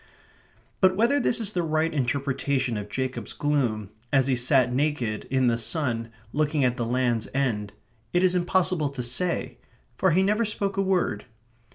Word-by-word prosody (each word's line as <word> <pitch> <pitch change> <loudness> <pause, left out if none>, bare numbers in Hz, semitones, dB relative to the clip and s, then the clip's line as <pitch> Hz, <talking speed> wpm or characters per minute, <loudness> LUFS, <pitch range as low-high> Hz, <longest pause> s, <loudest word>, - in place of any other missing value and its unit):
But 185 -1 +4
whether 235 +8 +3
this 240 - +1
is 215 -2 -1
the 180 - 0
right 160 0 0
interpretation 135 -1 -1
of 105 -1 -5
Jacob's 130 +4 -3
gloom 120 -9 -1 0.2
as 135 -2 +4
he 130 -1 +2
sat 125 0 +3
naked, 130 -6 -1
in 130 0 +2
the 120 -1 +2
sun, 115 -3 -1 0.2
looking 150 -1 +1
at 125 -1 +1
the 120 -2 -2
Land's 120 -2 0
End, 110 -7 0 0.4
it 175 +1 +2
is 185 -1 +4
impossible 180 -3 +1
to 135 -3 -5
say; 170 +9 -2 0.4
for 190 - +2
he 185 +3 +3
never 210 +4 +2
spoke 200 -2 -1
a 195 - +1
word. 185 - 0
140 Hz, 170 wpm, -26 LUFS, 120-180 Hz, 0.4 s, But